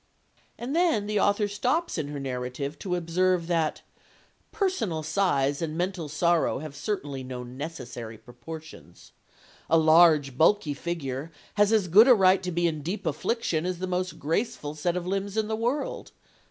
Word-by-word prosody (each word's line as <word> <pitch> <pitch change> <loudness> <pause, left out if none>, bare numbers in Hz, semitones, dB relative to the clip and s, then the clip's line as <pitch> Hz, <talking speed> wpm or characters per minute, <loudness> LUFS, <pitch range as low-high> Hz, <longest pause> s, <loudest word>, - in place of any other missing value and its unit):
And 255 +5 -4
then 330 - +2
the 210 0 0
author 205 +1 +2
stops 250 +12 -1
in 155 -4 -2
her 145 0 -5
narrative 130 +2 -4
to 180 -3 -2
observe 175 +1 +1
that 165 -2 -1 0.7
"Personal 260 - -1
size 150 -4 +1
and 160 -1 -3
mental 180 -3 -2
sorrow 170 +3 +2
have 145 +1 -7
certainly 145 -9 -4
no 125 -1 -6
necessary 125 -4 -7
proportions. 155 +8 -12 0.6
A 165 - +5
large, 155 -4 +5
bulky 165 -2 +3
figure 145 -2 -4 0.2
has 205 0 +3
as 215 -4 +3
good 210 +8 +7
a 255 - +8
right 190 -2 +4
to 180 -1 -3
be 175 0 0
in 155 -3 -1
deep 190 +6 -4
affliction 160 +2 -1
as 180 0 -2
the 185 - -3
most 180 -2 -2
graceful 160 - -2
set 170 +4 -1
of 175 - -4
limbs 195 +2 -2
in 215 -1 +1
the 220 - -1
world. 245 +6 -3
170 Hz, 165 wpm, -27 LUFS, 150-200 Hz, 0.7 s, a